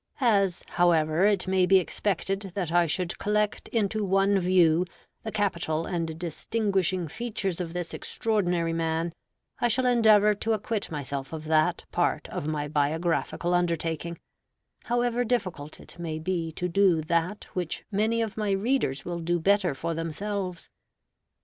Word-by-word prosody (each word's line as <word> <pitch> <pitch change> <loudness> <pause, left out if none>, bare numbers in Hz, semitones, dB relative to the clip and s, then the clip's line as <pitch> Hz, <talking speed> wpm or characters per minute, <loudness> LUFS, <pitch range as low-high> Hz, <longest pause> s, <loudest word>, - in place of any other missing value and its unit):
As, 200 -8 +2
however, 170 +1 +3
it 200 -3 +2
may 185 -1 +3
be 190 - +6
expected 195 +1 -1
that 180 -5 -2
I 175 0 +4
should 170 +3 -2
collect 210 0 0
into 215 -1 0
one 195 +1 +3
view 180 -1 +3 0.3
the 220 - -5
capital 170 -6 -1
and 165 -3 -3
distinguishing 185 +1 -1
features 195 -1 -3
of 170 -2 -5
this 175 -2 -4
extraordinary 180 -7 0
man, 165 0 -1 0.5
I - - +3
shall 255 +3 +1
endeavor 215 -4 +5
to 220 +2 -1
acquit 215 0 -2
myself 140 -3 -4
of 155 -1 -5
that 155 0 +1
part - - 0
of 145 - -4
my 150 -1 -2
biographical 160 +4 0
undertaking, 170 -1 -1 0.7
however 240 0 +1
difficult 185 -11 -2
it - - -11
may 160 -2 -3
be 165 0 -2
to 180 - -2
do 180 -2 +3
that 170 +5 0
which 175 -3 -3
many 220 +3 +1
of 220 -2 -5
my 215 -2 -1
readers 195 - 0
will 175 -1 -3
do 170 +1 0
better 190 -3 +2
for 165 +5 -3
themselves. 180 +3 -4
180 Hz, 150 wpm, -27 LUFS, 165-205 Hz, 0.7 s, be